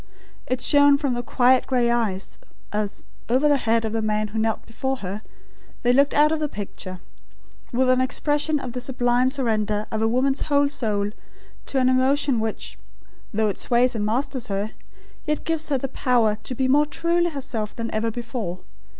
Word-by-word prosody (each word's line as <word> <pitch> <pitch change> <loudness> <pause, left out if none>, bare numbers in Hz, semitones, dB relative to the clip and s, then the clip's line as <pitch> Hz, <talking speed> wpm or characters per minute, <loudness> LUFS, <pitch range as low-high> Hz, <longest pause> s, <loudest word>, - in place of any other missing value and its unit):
It 255 0 -1
shone 285 0 +5
from 280 -3 -1
the 240 - -2
quiet 250 +1 +3
grey 245 -2 +2
eyes, 215 -5 -2 0.3
as, 210 -1 -3 0.2
over 260 +5 +3
the 290 -1 +4
head 230 0 +3
of 220 - -3
the 225 - 0
man 215 0 0
who 220 +2 -3
knelt 220 0 -1
before 265 +4 -2
her, 195 +4 -4 0.6
they 245 0 +4
looked 280 +2 +3
out 300 +1 +5
of 320 - 0
the 300 -1 -1
picture 185 -4 -7 0.7
with 255 +2 +2
an 255 0 +4
expression 290 +3 0
of 250 -3 -6
the 250 - -4
sublime 245 0 +1
surrender 215 -6 -1
of 220 - -1
a 225 - +3
woman's 265 +4 +1
whole 285 -1 +3
soul 210 -7 -1 0.6
to 275 - -2
an 255 - +3
emotion 260 0 +2
which, 220 0 -4 0.5
though 220 0 +1
it 195 - -4
sways 245 +1 +2
and 220 -3 -2
masters 250 +3 -1
her, 200 +1 -2 0.6
yet 300 0 -1
gives 320 -1 -2
her 280 - +2
the 270 - -3
power 240 -5 +2
to 255 - -4
be 260 +1 +1
more 295 +3 +4
truly 340 +3 +1
herself 240 -8 -4
than 230 0 -4
ever 220 +1 0
before. 225 -6 -5
245 Hz, 185 wpm, -23 LUFS, 220-275 Hz, 0.7 s, shone